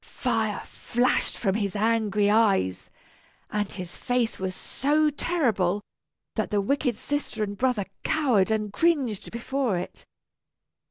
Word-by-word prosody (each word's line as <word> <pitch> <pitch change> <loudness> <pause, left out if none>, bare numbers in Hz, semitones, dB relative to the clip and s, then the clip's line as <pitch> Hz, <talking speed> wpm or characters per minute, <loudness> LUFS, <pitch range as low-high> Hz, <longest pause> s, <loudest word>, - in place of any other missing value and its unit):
Fire 225 -5 -1
flashed 245 +2 0
from 195 -4 +1
his 205 -1 -1
angry 210 -1 +2
eyes, 205 - +2 0.6
and 205 -2 -1
his 180 -3 -7
face 245 -2 -1
was 190 -1 -3
so 300 +7 +1
terrible 215 - +1 0.5
that - - -1
the 210 - +1
wicked 250 +3 +1
sister 285 -3 -2
and 205 -1 -3
brother 245 -3 +1 0.2
cowered 250 -11 +2
and 215 -2 -1
cringed 275 - +1
before 240 -2 -1
it. 175 - -6
220 Hz, 125 wpm, -26 LUFS, 200-255 Hz, 0.6 s, angry